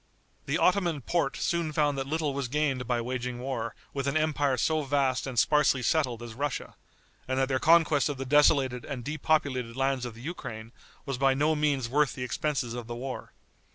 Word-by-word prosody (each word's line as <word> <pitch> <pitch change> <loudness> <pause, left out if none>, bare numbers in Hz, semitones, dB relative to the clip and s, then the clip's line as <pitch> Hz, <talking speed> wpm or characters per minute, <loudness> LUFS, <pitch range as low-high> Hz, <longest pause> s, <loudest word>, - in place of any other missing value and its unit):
The - - +1
Ottoman 175 -5 +2
Porte 155 0 0
soon 170 -2 -1
found 145 -1 +2
that 135 0 -3
little 155 -1 -1
was 140 -2 -2
gained 135 -2 -1
by 120 -1 0
waging 125 0 -3
war 120 -3 -4 0.2
with 140 -1 -2
an 140 +2 +1
empire 145 -4 +1
so 155 +2 +1
vast 135 -2 0
and 130 -2 -6
sparsely 145 0 +3
settled 125 -3 +1
as 115 -2 -8
Russia, 140 +3 -3 0.5
and 130 0 -1
that 135 0 +2
their 130 -1 +1
conquest 160 -3 +4
of 145 - -3
the 135 - -4
desolated 135 -3 +3
and 130 -4 -6
depopulated 145 -5 0
lands 135 -1 0
of 120 -3 -5
the 115 - -12
Ukraine, 115 -7 -7 0.3
was 135 -3 -3
by 135 -1 +3
no 150 +3 +2
means 145 -5 +1
worth 145 +3 +1
the 125 - -4
expenses 130 -2 -2
of 120 -1 -6
the 120 - -5
war. 130 +2 -6
135 Hz, 195 wpm, -28 LUFS, 125-150 Hz, 0.5 s, conquest